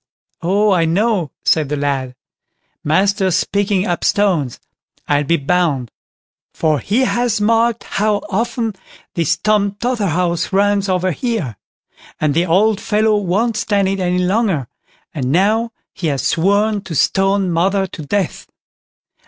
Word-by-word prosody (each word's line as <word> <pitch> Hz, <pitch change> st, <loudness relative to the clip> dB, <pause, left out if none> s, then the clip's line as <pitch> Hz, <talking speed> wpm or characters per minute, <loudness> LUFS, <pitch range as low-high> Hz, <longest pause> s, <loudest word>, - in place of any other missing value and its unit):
"Oh, 200 Hz, +4 st, +2 dB
I 175 Hz, -3 st, +3 dB
know", 190 Hz, 0 st, +1 dB, 0.2 s
said 155 Hz, -4 st, +2 dB
the 150 Hz, -, -1 dB
lad, 135 Hz, -3 st, -2 dB, 0.7 s
"master's 190 Hz, +3 st, +2 dB
picking 200 Hz, -1 st, 0 dB
up 175 Hz, -3 st, -2 dB
stones, 175 Hz, -, +1 dB, 0.5 s
I'll 145 Hz, 0 st, +1 dB
be 170 Hz, +4 st, +2 dB
bound; 145 Hz, -6 st, 0 dB, 0.6 s
for 155 Hz, -3 st, +1 dB
he 210 Hz, -, 0 dB
has 240 Hz, -3 st, +1 dB
marked 230 Hz, +2 st, +2 dB
how 210 Hz, 0 st, 0 dB
often 230 Hz, +2 st, -1 dB, 0.4 s
this 165 Hz, -4 st, 0 dB
Tom 210 Hz, -2 st, +1 dB
Totherhouse 185 Hz, -8 st, -1 dB
runs 200 Hz, 0 st, +2 dB
over 185 Hz, 0 st, +1 dB
here; 190 Hz, -, -3 dB, 0.6 s
and 155 Hz, -2 st, +1 dB
the 170 Hz, +4 st, +1 dB
old 205 Hz, +5 st, +2 dB
fellow 215 Hz, 0 st, +2 dB
won't 205 Hz, +4 st, 0 dB
stand 200 Hz, -2 st, +1 dB
it 195 Hz, 0 st, -2 dB
any 180 Hz, -1 st, 0 dB
longer; 190 Hz, -, 0 dB, 0.5 s
and 130 Hz, -4 st, -2 dB
now 215 Hz, +7 st, +2 dB, 0.2 s
he 175 Hz, -, -3 dB
has 140 Hz, -3 st, -1 dB
sworn 205 Hz, +4 st, +1 dB
to 165 Hz, -, -6 dB
stone 195 Hz, +4 st, +2 dB
mother 190 Hz, +4 st, +1 dB
to 170 Hz, -, -9 dB
death." 195 Hz, +4 st, -2 dB
195 Hz, 135 wpm, -17 LUFS, 165-210 Hz, 0.7 s, I